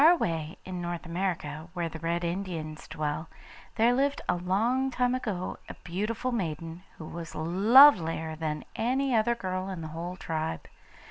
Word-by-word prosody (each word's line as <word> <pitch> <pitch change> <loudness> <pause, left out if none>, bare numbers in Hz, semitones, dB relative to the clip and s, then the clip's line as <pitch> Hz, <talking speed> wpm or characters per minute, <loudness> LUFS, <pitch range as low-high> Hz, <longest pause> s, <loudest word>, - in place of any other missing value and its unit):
Far 310 - +9
away, 165 - -2
in 185 -1 -5
North 175 0 -4
America, 170 -3 -3
where 175 -2 -1
the 160 0 -7
Red 170 +1 -1
Indians 170 -3 -4
dwell, 150 +1 -3 0.5
there 230 +2 +4
lived 280 +2 +1
a - - +3
long 220 +9 +1
time 250 -1 +1
ago 210 -8 -3
a - - -7
beautiful 215 +8 -2
maiden, 165 -5 -3 0.2
who 160 - -8
was 165 0 -7
lovelier 175 - +6
than 155 -1 -3
any 260 +3 +1
other 235 +1 +3
girl 185 -3 -3
in 185 -3 -5
the 160 - -5
whole 175 +2 -4
tribe. 155 - -3
180 Hz, 160 wpm, -29 LUFS, 160-230 Hz, 0.5 s, Far